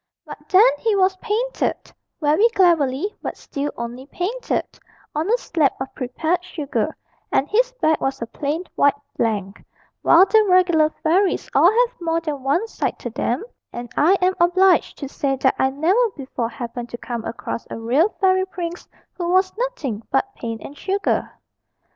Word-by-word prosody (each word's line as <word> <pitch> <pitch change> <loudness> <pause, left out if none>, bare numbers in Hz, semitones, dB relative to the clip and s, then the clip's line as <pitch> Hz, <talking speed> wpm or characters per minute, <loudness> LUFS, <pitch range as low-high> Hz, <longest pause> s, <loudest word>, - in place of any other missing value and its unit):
But - - -11
then 395 +5 +7
he 445 -2 +1
was 380 -1 +3
painted 460 +5 -2 0.3
very 315 +9 +4
cleverly 340 0 +2
but - - -5
still 285 +1 -4
only 240 +3 -6
painted, 460 +11 -3 0.3
on 310 +6 -1
a 475 - +4
slab 320 - +1
of 265 0 -5
prepared 315 +8 -2
sugar, 310 -6 -3 0.3
and 270 - +2
his - - +2
back 315 -11 +1
was 270 0 -1
a 230 - -3
plain 295 +7 -3
white 285 0 +3 0.2
blank; 205 -3 -2 0.4
while 345 +3 +7
the 435 +2 +4
regular 350 -4 +4
fairies 365 +5 +1
all 345 - +6
have 475 0 +1
more 330 -1 0
than 305 -4 -4
one 285 - +1
side - - -3
to 240 - -6
them, 245 - -1 0.3
and 240 0 -7
I 335 +7 +4
am 370 +1 +3
obliged 360 +1 +3
to 280 - -5
say 275 0 -1
that 265 0 +2
I 265 - +3
never 360 - +2
before 260 -4 -3
happened 240 0 -6
to 240 - -6
come 235 -2 -5
across 230 0 -5
a - - -5
real 260 - +2
fairy 375 -1 +3
prince 350 -2 -6 0.3
who 345 -2 -3
was 370 +1 +2
nothing 430 - -3
but 400 +9 0
paint 230 - -6
and 285 - -9
sugar. 395 +6 -1
325 Hz, 170 wpm, -21 LUFS, 265-380 Hz, 0.4 s, then